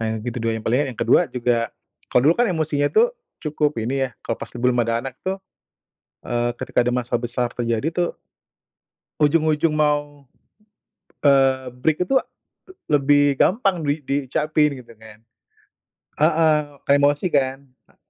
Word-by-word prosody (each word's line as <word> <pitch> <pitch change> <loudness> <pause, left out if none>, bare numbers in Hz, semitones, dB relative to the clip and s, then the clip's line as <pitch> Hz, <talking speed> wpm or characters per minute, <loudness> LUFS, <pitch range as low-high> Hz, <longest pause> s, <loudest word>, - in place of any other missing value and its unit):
Nah - - -2
yang - - -8
kedua 115 -1 -2
yang 110 -1 -6
paling, 120 +4 +2
eee, - - -4
yang - - -27
kedua - - +4
juga, 120 -1 0 0.5
kalau 125 - +4
dulu - - +3
kan 245 - +4
emosinya 155 -4 0
itu 450 - +5 0.4
cukup 150 -1 0
ini 135 +3 -1
ya, - - -19
kalau 115 - -2
pas - - -7
belum 125 0 0
ada 115 +1 -1
anak 130 -1 -6
tuh, 190 +1 -1 0.9
eee, 120 0 0
ketika - - -3
ada 125 - +1
masalah 120 -1 -1
besar 120 0 -2
terjadi 115 +3 -1
tuh, 175 -1 0 1.1
ujung-ujung 155 +1 +2
mau, 145 -1 0 1.0
eee, 135 -2 +3
break 155 +7 0
itu 270 - +3 0.7
lebih 145 -1 +3
gampang 195 -5 +2
di 145 +1 -1
diucapin 145 +1 0
gitu 115 -1 -16
kan. 110 -1 -15 1.0
Heeh. 155 -1 +4 0.3
Kayak 140 - +6
emosi 145 +4 +2
kan? 135 -2 +1 0.3
Eee. - - -28
140 Hz, 155 wpm, -22 LUFS, 125-150 Hz, 1.1 s, Kayak